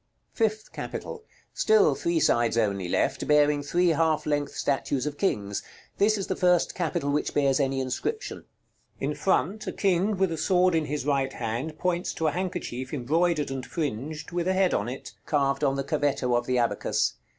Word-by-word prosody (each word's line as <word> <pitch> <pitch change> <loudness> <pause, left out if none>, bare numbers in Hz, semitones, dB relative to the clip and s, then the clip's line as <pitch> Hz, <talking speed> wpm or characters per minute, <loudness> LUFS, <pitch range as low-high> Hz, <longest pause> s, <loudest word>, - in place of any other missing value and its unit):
FIFTH 215 -1 -1
CAPITAL. 450 -2 -6 0.3
Still 215 -9 +4
three 170 +4 0
sides 120 -5 +2
only 100 -5 0
left, - - 0
bearing 150 -1 +4
three 175 +5 +2
half 160 -1 +2
length 145 -1 -1
statues 135 -1 -1
of 150 -1 -3
kings; 100 - -1 0.4
this 215 +2 +4
is 195 - -2
the - - -2
first 180 -1 +2
capital 165 -4 -1
which 150 - -1
bears 140 -2 +3
any 135 -1 +1
inscription. 130 - -3 0.5
In - - -1
front, 215 +2 0
a - - -1
king 195 +1 +1
with 190 -2 +2
a 165 - -2
sword 185 -1 +3
in 160 -2 +1
his 145 -2 -3
right 135 -2 +1
hand 120 +7 -4
points 180 0 -1
to 160 - -2
a 155 - +3
handkerchief 165 -8 -4
embroidered 150 +3 +1
and 135 -1 -4
fringed, 150 +1 -4
with 175 0 -1
a 190 - +2
head 190 -1 +2
on 105 +4 0
it, 130 - -7 0.2
carved 140 -2 +1
on 135 -1 +2
the 135 - -1
cavetto 140 -3 0
of 120 0 0
the 125 - +1
abacus. 120 -1 +1
150 Hz, 185 wpm, -27 LUFS, 135-180 Hz, 0.5 s, Still